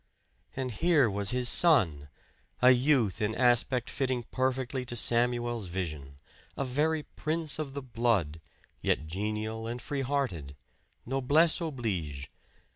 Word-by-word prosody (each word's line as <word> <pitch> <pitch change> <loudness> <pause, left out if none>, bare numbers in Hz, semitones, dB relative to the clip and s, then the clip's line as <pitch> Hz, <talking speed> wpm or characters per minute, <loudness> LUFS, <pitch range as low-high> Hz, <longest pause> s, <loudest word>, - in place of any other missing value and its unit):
And 130 -1 -3
here 150 +2 +3
was 100 0 -1
his 125 0 +1
son 95 - +3 0.5
a 125 +1 +7
youth 125 -5 +2
in 105 +1 0
aspect 125 0 +2
fitting 130 -3 -1
perfectly 130 0 -1
to 120 -1 -6
Samuel's 120 -2 +1
vision; 75 -7 -5 0.4
a 140 - -1
very 150 +4 0
prince 155 0 -3
of 140 -3 -5
the 140 - -4
blood, 115 - 0 0.4
yet 75 - 0
genial 110 +5 -3
and 120 +1 -4
free 140 +2 -3
hearted 120 - -2 0.5
noblesse 145 +7 +2
oblige! 95 - -3
120 Hz, 125 wpm, -29 LUFS, 105-135 Hz, 0.5 s, a